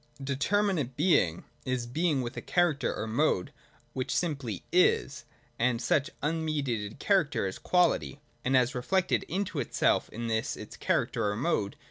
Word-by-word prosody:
7 135 Hz, -, -8 dB
90.j 140 Hz, -, -1 dB
(a) -, -, -2 dB
[Determinate 180 Hz, -, 0 dB
Being 145 Hz, -, +2 dB, 0.2 s
is 130 Hz, -2 st, -2 dB
Being 150 Hz, +3 st, 0 dB
with 120 Hz, -, -5 dB
a -, -, -4 dB
character 175 Hz, -5 st, +1 dB
or -, -, -3 dB
mode 110 Hz, -4 st, 0 dB, 0.2 s
— -, -, -33 dB
which 130 Hz, -1 st, -2 dB
simply 140 Hz, -, -2 dB
is; -, -, +2 dB, 0.3 s
and 120 Hz, 0 st, +2 dB
such 135 Hz, +3 st, +1 dB
un 160 Hz, +2 st, 0 dB
mediated 125 Hz, -9 st, -2 dB
character 185 Hz, -, +1 dB
is 95 Hz, -, -4 dB
Quality^ 175 Hz, -5 st, +2 dB, 0.3 s
And 130 Hz, +1 st, +3 dB
as 125 Hz, 0 st, +2 dB
reflected 185 Hz, +10 st, +1 dB
into 195 Hz, +2 st, -2 dB
itself -, -, +1 dB
in 115 Hz, +2 st, -6 dB
this 110 Hz, -1 st, -1 dB
its -, -, -9 dB
character 105 Hz, -, 0 dB
or 100 Hz, -, -2 dB
mode. 110 Hz, -5 st, 0 dB
135 Hz, 170 wpm, -29 LUFS, 120-165 Hz, 0.3 s, And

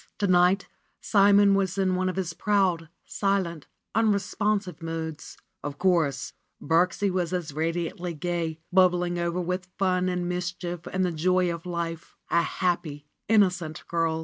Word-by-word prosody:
To 205 Hz, -, 0 dB
night 185 Hz, +1 st, +3 dB, 0.3 s
Simon 200 Hz, -1 st, +5 dB
was 195 Hz, -1 st, 0 dB
in 190 Hz, -1 st, +2 dB
one 185 Hz, 0 st, 0 dB
of 185 Hz, -, -4 dB
his 180 Hz, -3 st, -2 dB
proud, 180 Hz, -3 st, +1 dB, 0.2 s
silent, 190 Hz, -6 st, -1 dB, 0.3 s
unre 215 Hz, -2 st, +3 dB
sponsive 205 Hz, -3 st, -2 dB
moods. 160 Hz, -1 st, -5 dB, 0.3 s
Of 145 Hz, -1 st, -5 dB
course, 165 Hz, -8 st, +1 dB, 0.3 s
Birksie 180 Hz, +4 st, +2 dB
was 180 Hz, -2 st, -1 dB
as 170 Hz, -5 st, -3 dB
radiantly 165 Hz, +2 st, -2 dB
gay, 165 Hz, 0 st, -2 dB
bubbling 180 Hz, -1 st, +3 dB
over 170 Hz, +1 st, -1 dB
with 180 Hz, +1 st, -3 dB
fun 185 Hz, -1 st, +1 dB
and 180 Hz, -1 st, -2 dB
mischief 175 Hz, -1 st, -4 dB
and 185 Hz, 0 st, 0 dB
the 180 Hz, -, 0 dB
joy 180 Hz, +2 st, +1 dB
of 170 Hz, +1 st, -8 dB
life, 170 Hz, -1 st, -4 dB, 0.2 s
a 170 Hz, -, +4 dB
happy, 165 Hz, -4 st, -2 dB, 0.2 s
innocent 180 Hz, -7 st, +2 dB
girl. 165 Hz, -1 st, 0 dB
180 Hz, 150 wpm, -26 LUFS, 165-185 Hz, 0.3 s, Simon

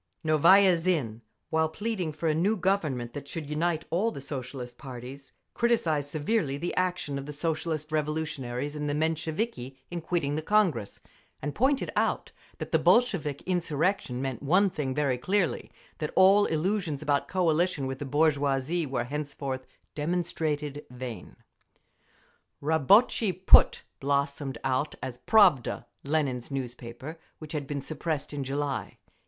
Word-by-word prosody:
Novaya 175 Hz, +5 st, +6 dB
Zhizn, 155 Hz, -11 st, -1 dB, 0.3 s
while 160 Hz, 0 st, +2 dB
pleading 190 Hz, -1 st, -3 dB
for 155 Hz, +2 st, -3 dB
a 155 Hz, -, +3 dB
new 195 Hz, +8 st, +1 dB
Government 155 Hz, -11 st, 0 dB
that 140 Hz, -1 st, -7 dB
should 155 Hz, +1 st, -5 dB
unite 160 Hz, +2 st, -1 dB
all 190 Hz, +7 st, +2 dB
the 185 Hz, -, -7 dB
Socialist 125 Hz, -3 st, -7 dB
parties, 130 Hz, +1 st, -9 dB, 0.2 s
criticised 165 Hz, -, +1 dB
severely 155 Hz, -1 st, 0 dB
the 175 Hz, +4 st, -3 dB
action 180 Hz, -6 st, -1 dB
of 140 Hz, -, -8 dB
the -, -, -5 dB
Socialist 155 Hz, 0 st, -2 dB
Revolutionaries 150 Hz, -3 st, -2 dB
and 150 Hz, -1 st, -2 dB
the 145 Hz, -, 0 dB
Mensheviki 160 Hz, -, -2 dB
in 175 Hz, -1 st, -3 dB
quitting 160 Hz, -4 st, -1 dB
the 155 Hz, -, -1 dB
Congress, 165 Hz, -, +1 dB, 0.4 s
and 145 Hz, +1 st, -4 dB
pointed 265 Hz, +3 st, +1 dB
out -, -, 0 dB, 0.3 s
that -, -, -6 dB
the -, -, +4 dB
Bolshevik 155 Hz, -, +2 dB
insurrection 165 Hz, -6 st, 0 dB
meant 130 Hz, -3 st, -3 dB
one 185 Hz, +7 st, +3 dB
thing 135 Hz, -5 st, -3 dB
very 140 Hz, -4 st, +1 dB
clearly: 185 Hz, +5 st, 0 dB, 0.3 s
that 150 Hz, -, -2 dB
all 195 Hz, +2 st, +6 dB
illusions 160 Hz, -2 st, -1 dB
about 140 Hz, -2 st, +1 dB
coalition 175 Hz, -4 st, +1 dB
with 130 Hz, 0 st, -4 dB
the -, -, -3 dB
bourgeoisie 145 Hz, +2 st, +1 dB
were 125 Hz, -2 st, -1 dB
henceforth 140 Hz, -1 st, -4 dB, 0.3 s
demonstrated 150 Hz, -3 st, -2 dB
vain… 125 Hz, -2 st, -8 dB, 1.2 s
Rabotchi 185 Hz, -, +4 dB
Put 185 Hz, +2 st, +6 dB, 0.2 s
blossomed 140 Hz, -1 st, -1 dB
out 130 Hz, +3 st, 0 dB
as 125 Hz, -2 st, -5 dB
Pravda, 185 Hz, -, +4 dB, 0.2 s
Lenin's 140 Hz, -4 st, -1 dB
newspaper 130 Hz, +3 st, -6 dB, 0.2 s
which 155 Hz, -1 st, -9 dB
had 145 Hz, -3 st, -3 dB
been 140 Hz, -1 st, -3 dB
suppressed 155 Hz, +1 st, -3 dB
in 145 Hz, -1 st, -3 dB
July. 140 Hz, +1 st, -3 dB
150 Hz, 140 wpm, -28 LUFS, 135-175 Hz, 1.2 s, Novaya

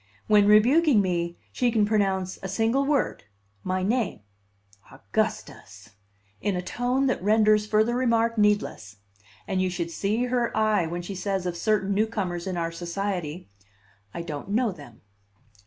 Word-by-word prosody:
When 210 Hz, -1 st, +4 dB
rebuking 245 Hz, +6 st, +5 dB
me, 175 Hz, -3 st, -1 dB
she 245 Hz, -, +1 dB
can 220 Hz, -3 st, +2 dB
pronounce 195 Hz, -3 st, 0 dB
a 190 Hz, -, -4 dB
single 225 Hz, +8 st, +1 dB
word, 285 Hz, -1 st, 0 dB, 0.4 s
my 185 Hz, 0 st, -1 dB
name, 220 Hz, -, -1 dB, 0.7 s
"Augustus!" -, -, -4 dB, 0.5 s
in 205 Hz, -, 0 dB
a 180 Hz, -, -2 dB
tone 250 Hz, +7 st, -1 dB
that 255 Hz, -, 0 dB
renders 210 Hz, +1 st, +3 dB
further 220 Hz, +3 st, +2 dB
remark 230 Hz, -2 st, +1 dB
needless; 205 Hz, -, 0 dB, 0.5 s
and 190 Hz, -1 st, 0 dB
you 185 Hz, -, +1 dB
should 170 Hz, -2 st, -4 dB
see 210 Hz, +7 st, -1 dB
her 245 Hz, -2 st, -1 dB
eye 215 Hz, -5 st, +2 dB
when 175 Hz, +2 st, -4 dB
she 195 Hz, -, -6 dB
says 190 Hz, 0 st, -2 dB
of 175 Hz, -1 st, -2 dB
certain 200 Hz, +1 st, 0 dB
newcomers 195 Hz, -5 st, -1 dB
in 185 Hz, -2 st, -3 dB
our 165 Hz, -1 st, -2 dB
society, 175 Hz, -1 st, -4 dB, 0.6 s
"I 170 Hz, -, -6 dB
don't 155 Hz, +1 st, -7 dB
know 225 Hz, +2 st, +1 dB
them." 145 Hz, -10 st, -13 dB
205 Hz, 150 wpm, -25 LUFS, 180-225 Hz, 0.7 s, rebuking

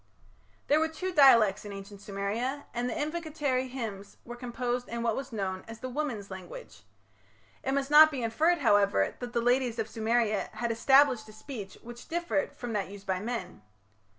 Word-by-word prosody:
There 295 Hz, +2 st, +3 dB
were 320 Hz, -, +2 dB
two 365 Hz, +4 st, -5 dB
dialects 230 Hz, -, +6 dB
in 205 Hz, -, -8 dB
ancient 200 Hz, 0 st, -9 dB
Sumeria, 215 Hz, +8 st, -3 dB
and 245 Hz, +1 st, -1 dB
the -, -, -3 dB
invocatory 300 Hz, -5 st, -2 dB
hymns 210 Hz, -6 st, -6 dB
were 240 Hz, -, -7 dB
composed 245 Hz, 0 st, -3 dB
in 235 Hz, 0 st, -3 dB
what 230 Hz, -2 st, +1 dB
was 270 Hz, -, -5 dB
known 190 Hz, -4 st, -3 dB
as 225 Hz, 0 st, -9 dB
"the 255 Hz, -, -5 dB
women's 245 Hz, -8 st, -4 dB
language". 190 Hz, -, -10 dB, 0.8 s
It 270 Hz, -, -1 dB
must 280 Hz, +1 st, -1 dB
not 310 Hz, +1 st, +9 dB
be 270 Hz, -5 st, -4 dB
inferred, 315 Hz, +10 st, +2 dB
however, 200 Hz, -, +3 dB
that 245 Hz, -1 st, -6 dB
the 235 Hz, -, +1 dB
ladies 245 Hz, 0 st, +1 dB
of 225 Hz, -1 st, -1 dB
Sumeria 220 Hz, -1 st, 0 dB
had 230 Hz, +2 st, -2 dB
established 255 Hz, -1 st, +4 dB
a -, -, -12 dB
speech 215 Hz, -4 st, -8 dB
which 240 Hz, +1 st, -10 dB
differed 340 Hz, -3 st, -1 dB
from 240 Hz, -2 st, -5 dB
that 200 Hz, -3 st, -2 dB
used 200 Hz, 0 st, -11 dB
by 190 Hz, -2 st, -1 dB
men. 200 Hz, -, -5 dB
240 Hz, 180 wpm, -29 LUFS, 210-270 Hz, 0.8 s, not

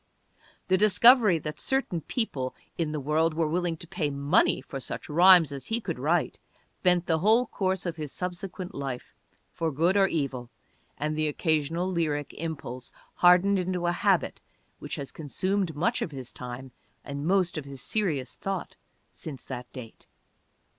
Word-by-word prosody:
The 185 Hz, 0 st, +3 dB
discovery 215 Hz, -1 st, +6 dB
that 150 Hz, -1 st, -6 dB
certain 265 Hz, -11 st, 0 dB
people 140 Hz, -, -3 dB, 0.2 s
in 160 Hz, -3 st, -1 dB
the 155 Hz, -, -2 dB
world 155 Hz, +3 st, +1 dB
were 165 Hz, 0 st, +1 dB
willing 170 Hz, +1 st, -1 dB
to 170 Hz, -, -10 dB
pay 160 Hz, -4 st, -2 dB
money 140 Hz, +4 st, +2 dB
for 135 Hz, -, -7 dB
such -, -, -6 dB
rhymes 170 Hz, -1 st, +6 dB
as 140 Hz, -2 st, -6 dB
he 225 Hz, +1 st, -1 dB
could -, -, -5 dB
write -, -, 0 dB, 0.4 s
bent 180 Hz, -1 st, +3 dB
the 160 Hz, -2 st, +1 dB
whole 220 Hz, +7 st, +4 dB
course 190 Hz, -4 st, -2 dB
of 170 Hz, -2 st, -3 dB
his 150 Hz, -3 st, -5 dB
subsequent 180 Hz, 0 st, -5 dB
life, 135 Hz, -3 st, -5 dB, 0.4 s
for 165 Hz, -1 st, -2 dB
good 165 Hz, +7 st, +2 dB
or 195 Hz, -1 st, +5 dB
evil, 135 Hz, -8 st, -3 dB, 0.5 s
and 150 Hz, +1 st, -2 dB
the 155 Hz, 0 st, 0 dB
occasional 160 Hz, +3 st, 0 dB
lyric 155 Hz, -5 st, -1 dB
impulse 140 Hz, -6 st, -6 dB, 0.2 s
hardened 180 Hz, +3 st, +5 dB
into 180 Hz, -1 st, -2 dB
a 175 Hz, -, +2 dB
habit 185 Hz, +1 st, +1 dB, 0.4 s
which -, -, -5 dB
has 140 Hz, -, -6 dB
consumed 185 Hz, +3 st, -2 dB
much 155 Hz, +5 st, 0 dB
of -, -, -1 dB
his 130 Hz, -5 st, -8 dB
time 125 Hz, +1 st, -8 dB, 0.3 s
and 140 Hz, +2 st, -4 dB
most 185 Hz, -2 st, +2 dB
of 155 Hz, -3 st, -4 dB
his 140 Hz, -1 st, -9 dB
serious 150 Hz, -, -1 dB
thought 195 Hz, -2 st, -5 dB, 0.3 s
since 150 Hz, -6 st, -8 dB
that 125 Hz, -2 st, -7 dB
date. 115 Hz, -4 st, -11 dB
165 Hz, 165 wpm, -27 LUFS, 140-185 Hz, 0.5 s, discovery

